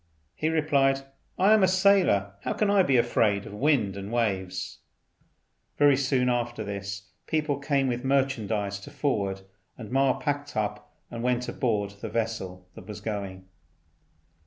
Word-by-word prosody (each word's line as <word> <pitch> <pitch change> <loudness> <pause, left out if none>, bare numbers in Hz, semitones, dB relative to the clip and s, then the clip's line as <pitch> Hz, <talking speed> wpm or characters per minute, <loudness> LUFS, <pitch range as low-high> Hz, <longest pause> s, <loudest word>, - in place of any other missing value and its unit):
He 155 - -1
replied, 140 -4 +2 0.4
"I 195 +4 +5
am 215 - +5
a 190 - +5
sailor: 185 - +3
how - - -2
can 210 -2 +1
I 200 -1 +5
be 135 -8 +3
afraid 110 -4 +2
of - - -9
wind 115 -5 +1
and 100 +1 -6
waves?" 95 -6 -2 1.0
Very 145 -1 +6
soon 130 -1 +1
after 120 -2 -1
this 100 -1 -6 0.2
people 150 -3 0
came 140 -1 +1
with 125 0 -2
merchandise 110 -7 0
to 100 - -11
forward, 110 -10 -1 0.4
and 110 - -8
so - - -8
Ma 135 -1 +3
packed 145 -2 -3
up 105 -1 -3 0.2
and 115 -1 -5
went 125 0 0
on - - -7
board 105 -5 0
the - - -4
vessel 95 -6 -3
that 95 - -12
was 105 -2 -7
going. 100 -3 -5
120 Hz, 160 wpm, -27 LUFS, 100-140 Hz, 1.0 s, Very